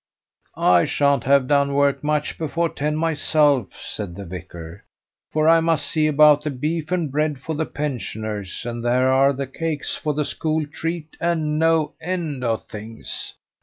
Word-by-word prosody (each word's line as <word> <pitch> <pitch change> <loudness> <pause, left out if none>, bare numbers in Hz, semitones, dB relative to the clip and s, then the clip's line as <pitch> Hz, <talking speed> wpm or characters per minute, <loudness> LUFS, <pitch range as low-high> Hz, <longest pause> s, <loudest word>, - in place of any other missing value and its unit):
"I 90 -1 +4
sha'n't 140 -3 +1
have 140 0 +4
done 140 -1 +2
work 140 0 +2
much 150 0 -1
before 165 +1 0
ten 150 +1 -2
myself," 150 -5 +2
said 95 -5 -6
the 100 +1 -7
vicar; 85 0 -9 0.5
"for 155 0 +2
I 165 0 +7
must 165 -3 +1
see 155 +2 +1
about 150 0 +6
the 150 - -2
beef 155 +4 -3
and 170 -6 0
bread 150 0 0
for 160 +5 -5
the 155 +1 -2
pensioners, 110 -8 -4
and 120 -1 -4
there 125 +2 +2
are 135 +1 +5
the 140 0 -3
cakes 150 +2 -3
for 150 -3 -2
the 150 0 0
school 155 +1 -1
treat, 160 +1 -5
and 155 -3 0
no 160 -2 +2
end 160 -6 -3
of 115 -2 0
things. 110 +2 -7
150 Hz, 165 wpm, -22 LUFS, 130-155 Hz, 0.5 s, I